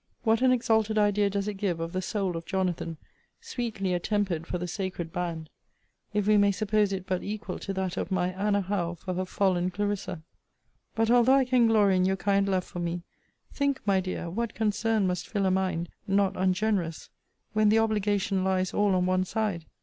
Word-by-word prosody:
What 225 Hz, 0 st, +3 dB
an 260 Hz, -1 st, +5 dB
exalted 220 Hz, -3 st, +2 dB
idea 205 Hz, -1 st, +3 dB
does 200 Hz, 0 st, -2 dB
it 210 Hz, -2 st, -3 dB
give 190 Hz, -5 st, -1 dB
of 165 Hz, +1 st, -4 dB
the 185 Hz, -, -1 dB
soul 190 Hz, -2 st, -2 dB
of 165 Hz, 0 st, -6 dB
Jonathan, 180 Hz, -4 st, -2 dB, 0.4 s
sweetly 230 Hz, -, -3 dB
attempered 180 Hz, -2 st, -1 dB
for 180 Hz, -, -2 dB
the 180 Hz, 0 st, -4 dB
sacred 180 Hz, -3 st, -4 dB
band, 165 Hz, -3 st, -4 dB, 0.6 s
if 210 Hz, -1 st, 0 dB
we 210 Hz, 0 st, +5 dB
may 205 Hz, 0 st, +5 dB
suppose 210 Hz, 0 st, +1 dB
it 190 Hz, -1 st, -3 dB
but 185 Hz, -1 st, -1 dB
equal 210 Hz, +1 st, -5 dB
to 195 Hz, -, -4 dB
that 190 Hz, -1 st, -2 dB
of -, -, -2 dB
my 180 Hz, -2 st, +1 dB
Anna 200 Hz, +2 st, +1 dB
Howe 180 Hz, -3 st, -2 dB
for 185 Hz, +2 st, -5 dB
her 185 Hz, +1 st, -2 dB
fallen 185 Hz, -2 st, +1 dB
Clarissa? 190 Hz, -3 st, -3 dB, 0.7 s
But, 225 Hz, 0 st, +2 dB
although 245 Hz, +2 st, +6 dB
I 270 Hz, -1 st, +4 dB
can 250 Hz, -2 st, +4 dB
glory 205 Hz, -4 st, +4 dB
in 185 Hz, -, +3 dB
your 190 Hz, 0 st, +1 dB
kind 200 Hz, 0 st, +1 dB
love 185 Hz, -1 st, +1 dB
for 175 Hz, -, -8 dB
me, 170 Hz, 0 st, -3 dB, 0.5 s
think, 280 Hz, -1 st, 0 dB
my 195 Hz, -2 st, +3 dB
dear, 185 Hz, -2 st, -4 dB
what 220 Hz, +6 st, -3 dB
concern 220 Hz, 0 st, +1 dB
must 180 Hz, -1 st, -2 dB
fill 200 Hz, -3 st, -1 dB
a 190 Hz, -, +3 dB
mind, 185 Hz, -3 st, 0 dB, 0.2 s
not 195 Hz, -1 st, +2 dB
ungenerous, 185 Hz, -2 st, 0 dB, 0.4 s
when 215 Hz, 0 st, +4 dB
the 220 Hz, -, +4 dB
obligation 205 Hz, -3 st, +1 dB
lies 185 Hz, -1 st, 0 dB
all 205 Hz, -2 st, +2 dB
on 180 Hz, 0 st, +2 dB
one 185 Hz, 0 st, +2 dB
side. 195 Hz, -4 st, -2 dB
195 Hz, 195 wpm, -28 LUFS, 180-210 Hz, 0.7 s, although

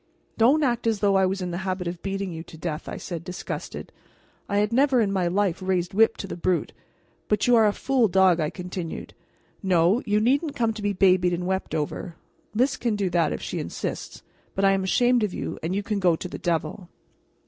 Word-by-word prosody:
"Don't 270 Hz, +7 st, +4 dB
act 240 Hz, -4 st, 0 dB
as 220 Hz, -2 st, +1 dB
though 200 Hz, -1 st, +3 dB
I 190 Hz, -1 st, +4 dB
was 190 Hz, 0 st, -2 dB
in 180 Hz, -, -3 dB
the 175 Hz, -, -3 dB
habit 185 Hz, -1 st, -3 dB
of 170 Hz, 0 st, -5 dB
beating 195 Hz, -2 st, -3 dB
you 160 Hz, -, -6 dB
to 160 Hz, -, -12 dB
death," 155 Hz, -2 st, -4 dB
I -, -, -5 dB
said, 170 Hz, -3 st, -6 dB
disgusted. 180 Hz, +1 st, -6 dB, 0.6 s
I 200 Hz, -, 0 dB
had 210 Hz, +2 st, +1 dB
never 265 Hz, 0 st, +4 dB
in 210 Hz, -4 st, +2 dB
my 185 Hz, -3 st, +1 dB
life 190 Hz, 0 st, 0 dB
raised 185 Hz, -2 st, -1 dB
whip 225 Hz, +3 st, +4 dB
to -, -, -5 dB
the -, -, -5 dB
brute. 175 Hz, 0 st, -1 dB, 0.5 s
"But 210 Hz, -1 st, +1 dB
you 245 Hz, -, +5 dB
are 220 Hz, -2 st, +6 dB
a -, -, +3 dB
fool 255 Hz, +1 st, +1 dB
dog," 190 Hz, -2 st, +4 dB
I 155 Hz, -2 st, 0 dB
continued. 180 Hz, -2 st, -6 dB, 0.5 s
"No, 185 Hz, +4 st, +3 dB
you 210 Hz, 0 st, +3 dB
needn't 280 Hz, +7 st, +1 dB
come 230 Hz, -2 st, +1 dB
to 215 Hz, -, -8 dB
be 205 Hz, 0 st, 0 dB
babied 185 Hz, -2 st, +3 dB
and 175 Hz, +1 st, -2 dB
wept 190 Hz, -3 st, -2 dB
over; 160 Hz, +3 st, -3 dB, 0.4 s
Lys 255 Hz, +5 st, +2 dB
can 235 Hz, -3 st, 0 dB
do 195 Hz, -3 st, -1 dB
that, 165 Hz, -3 st, +2 dB
if -, -, -4 dB
she -, -, -3 dB
insists, -, -, -5 dB, 0.3 s
but 195 Hz, -, +2 dB
I 195 Hz, -, +6 dB
am 195 Hz, -1 st, +1 dB
ashamed 245 Hz, +6 st, +3 dB
of 210 Hz, -4 st, -1 dB
you, -, -, -4 dB
and 170 Hz, +4 st, -2 dB
you 200 Hz, -, -1 dB
can 210 Hz, 0 st, -2 dB
go 180 Hz, -3 st, +3 dB
to 180 Hz, -, -6 dB
the -, -, -8 dB
devil." 170 Hz, +1 st, -2 dB
190 Hz, 225 wpm, -25 LUFS, 180-215 Hz, 0.6 s, are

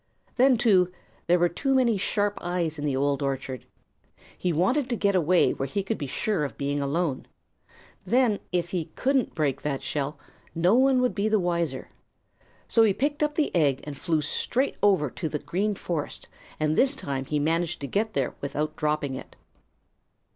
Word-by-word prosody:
Then, 255 Hz, 0 st, +5 dB
too, 190 Hz, -6 st, +4 dB, 0.4 s
there 175 Hz, +1 st, +5 dB
were 175 Hz, 0 st, +3 dB
too 270 Hz, +11 st, 0 dB
many 245 Hz, -4 st, +3 dB
sharp 205 Hz, +1 st, 0 dB
eyes 170 Hz, -3 st, -2 dB
in 145 Hz, -, -3 dB
the 140 Hz, -3 st, 0 dB
Old 140 Hz, +1 st, 0 dB
Orchard. 135 Hz, -2 st, -3 dB, 0.7 s
He 180 Hz, -, -1 dB
wanted 240 Hz, -, +1 dB
to 240 Hz, -, 0 dB
get 200 Hz, -2 st, +1 dB
away 180 Hz, 0 st, +3 dB
where 135 Hz, -, -3 dB
he 195 Hz, +9 st, -2 dB
could 215 Hz, +3 st, -3 dB
be 145 Hz, -, -3 dB
sure 195 Hz, +4 st, -1 dB
of 140 Hz, -6 st, -5 dB
being 145 Hz, +1 st, -1 dB
alone. 140 Hz, 0 st, -1 dB, 0.8 s
Then 240 Hz, -4 st, +2 dB
if 175 Hz, -1 st, 0 dB
he 175 Hz, -4 st, -1 dB
couldn't 265 Hz, -2 st, +1 dB
break 140 Hz, -4 st, 0 dB
that 140 Hz, -2 st, -3 dB
shell, 145 Hz, +1 st, -2 dB, 0.4 s
no 175 Hz, +4 st, +3 dB
one 260 Hz, +1 st, +4 dB
would 250 Hz, -, +1 dB
be 210 Hz, +1 st, 0 dB
the 215 Hz, -1 st, +3 dB
wiser. 170 Hz, -7 st, -1 dB, 0.8 s
So 230 Hz, -, +4 dB
he 215 Hz, -3 st, +5 dB
picked 290 Hz, +3 st, -1 dB
up 300 Hz, 0 st, +1 dB
the 310 Hz, -, 0 dB
egg 140 Hz, -6 st, +2 dB
and 145 Hz, -1 st, -6 dB
flew 160 Hz, +1 st, 0 dB
straight 255 Hz, -, 0 dB
over 190 Hz, -7 st, +4 dB
to 160 Hz, -, -4 dB
the 150 Hz, -, -2 dB
Green 185 Hz, +9 st, -1 dB
Forest, 165 Hz, -5 st, -4 dB, 0.3 s
and 155 Hz, 0 st, +1 dB
this 270 Hz, -, +3 dB
time 135 Hz, -, -4 dB
he 150 Hz, -, -1 dB
managed 165 Hz, +4 st, 0 dB
to 140 Hz, -, -3 dB
get 215 Hz, +8 st, -1 dB
there 135 Hz, -3 st, -1 dB
without 150 Hz, +2 st, -3 dB
dropping 150 Hz, -3 st, -1 dB
it. 130 Hz, -, -8 dB
175 Hz, 185 wpm, -26 LUFS, 145-215 Hz, 0.8 s, Then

